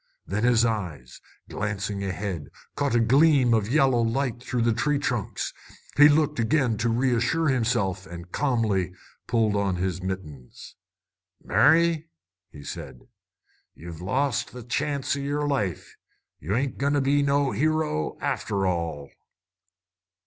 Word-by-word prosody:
Then 105 Hz, +3 st, -2 dB
his 120 Hz, -1 st, +4 dB
eyes, 90 Hz, -, -4 dB, 0.3 s
glancing 100 Hz, -1 st, -3 dB
ahead, 95 Hz, -5 st, -4 dB, 0.3 s
caught 140 Hz, -4 st, 0 dB
a -, -, +4 dB
gleam 135 Hz, +1 st, +4 dB
of 110 Hz, -2 st, +1 dB
yellow 135 Hz, -3 st, +3 dB
light 120 Hz, +1 st, -1 dB
through 125 Hz, -2 st, -1 dB
the 115 Hz, -1 st, +3 dB
tree 150 Hz, +5 st, +1 dB
trunks. 120 Hz, -6 st, -2 dB, 0.4 s
He 145 Hz, +1 st, +8 dB
looked 150 Hz, -1 st, +2 dB
again, 120 Hz, 0 st, +2 dB
to 120 Hz, +3 st, +1 dB
assure 150 Hz, +7 st, +1 dB
himself, 110 Hz, -7 st, 0 dB
and 85 Hz, +1 st, -10 dB
calmly 110 Hz, -10 st, 0 dB, 0.3 s
pulled 110 Hz, -3 st, +1 dB
on 100 Hz, -2 st, 0 dB
his 90 Hz, 0 st, -2 dB
mittens. 85 Hz, -9 st, -7 dB, 0.7 s
"Mary," 160 Hz, -, +3 dB, 0.5 s
said 65 Hz, -, -8 dB, 0.7 s
he, -, -, -19 dB
"you've 85 Hz, -1 st, -8 dB
lost 125 Hz, +5 st, -1 dB
the 125 Hz, -1 st, -8 dB
chance 140 Hz, +4 st, -1 dB
o' -, -, -4 dB
yer 145 Hz, +1 st, -2 dB
life. 105 Hz, -, -2 dB, 0.4 s
Ye 80 Hz, -, -6 dB
ain't 130 Hz, +5 st, -1 dB
goin' 140 Hz, +1 st, +1 dB
to 145 Hz, -, +2 dB
be 140 Hz, +2 st, +2 dB
no 140 Hz, -1 st, +2 dB
hero, 155 Hz, -, 0 dB
after 100 Hz, -1 st, -1 dB
all!" 85 Hz, -6 st, -2 dB
115 Hz, 135 wpm, -25 LUFS, 95-140 Hz, 0.7 s, He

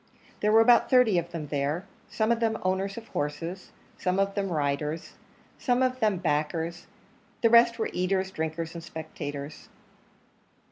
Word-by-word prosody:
There 210 Hz, -, +2 dB
were 225 Hz, +1 st, +7 dB
about 235 Hz, +1 st, +5 dB
thirty 250 Hz, -8 st, +5 dB
of 170 Hz, 0 st, -6 dB
them 160 Hz, -4 st, -6 dB
there, 145 Hz, +5 st, -1 dB, 0.2 s
some 220 Hz, 0 st, 0 dB
of 235 Hz, -, +2 dB
them 225 Hz, -1 st, +1 dB
owners 190 Hz, +2 st, -1 dB
of 225 Hz, -1 st, -9 dB
horses, 165 Hz, +6 st, -4 dB, 0.3 s
some 185 Hz, 0 st, 0 dB
of 195 Hz, 0 st, +1 dB
them 195 Hz, -2 st, -2 dB
riders, 150 Hz, +1 st, -2 dB, 0.5 s
some 250 Hz, 0 st, +2 dB
of 255 Hz, 0 st, 0 dB
them 215 Hz, -5 st, +2 dB
backers; 165 Hz, +1 st, -2 dB, 0.6 s
the 230 Hz, -, +5 dB
rest 235 Hz, 0 st, +6 dB
were 225 Hz, -, -2 dB
eaters, 190 Hz, +1 st, 0 dB
drinkers, 160 Hz, -1 st, -3 dB
and 170 Hz, -1 st, -7 dB
spectators. 150 Hz, -2 st, -7 dB
185 Hz, 155 wpm, -27 LUFS, 160-220 Hz, 0.6 s, were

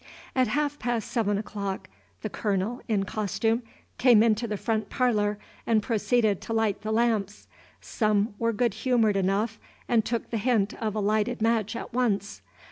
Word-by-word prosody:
At 255 Hz, -1 st, +3 dB
half 290 Hz, +5 st, -1 dB
past 240 Hz, -2 st, -2 dB
seven 205 Hz, -4 st, +1 dB
o'clock, 200 Hz, -2 st, -4 dB, 0.4 s
the 215 Hz, -, -2 dB
Colonel, 210 Hz, +3 st, -1 dB
in 210 Hz, -4 st, +1 dB
costume, 220 Hz, +3 st, -1 dB, 0.4 s
came 240 Hz, -4 st, +6 dB
into 230 Hz, +1 st, +2 dB
the 210 Hz, -1 st, -2 dB
front 220 Hz, -1 st, -1 dB
parlor, 210 Hz, -5 st, +1 dB, 0.3 s
and 220 Hz, -2 st, +3 dB
proceeded 220 Hz, -2 st, +1 dB
to 225 Hz, -, -4 dB
light 220 Hz, -3 st, +1 dB
the 215 Hz, +1 st, -3 dB
lamps. 220 Hz, -3 st, 0 dB, 0.3 s
Some 210 Hz, -1 st, 0 dB
were 230 Hz, 0 st, +2 dB
good 230 Hz, 0 st, +1 dB
humored 225 Hz, -2 st, +2 dB
enough 200 Hz, +3 st, 0 dB, 0.3 s
and 230 Hz, -2 st, +3 dB
took 235 Hz, +1 st, -3 dB
the 230 Hz, -, 0 dB
hint 215 Hz, -3 st, +1 dB
of 215 Hz, -2 st, -1 dB
a -, -, 0 dB
lighted 215 Hz, +4 st, +1 dB
match 225 Hz, -1 st, +1 dB
at 230 Hz, -, -6 dB
once. 210 Hz, -5 st, 0 dB
220 Hz, 165 wpm, -27 LUFS, 205-235 Hz, 0.4 s, came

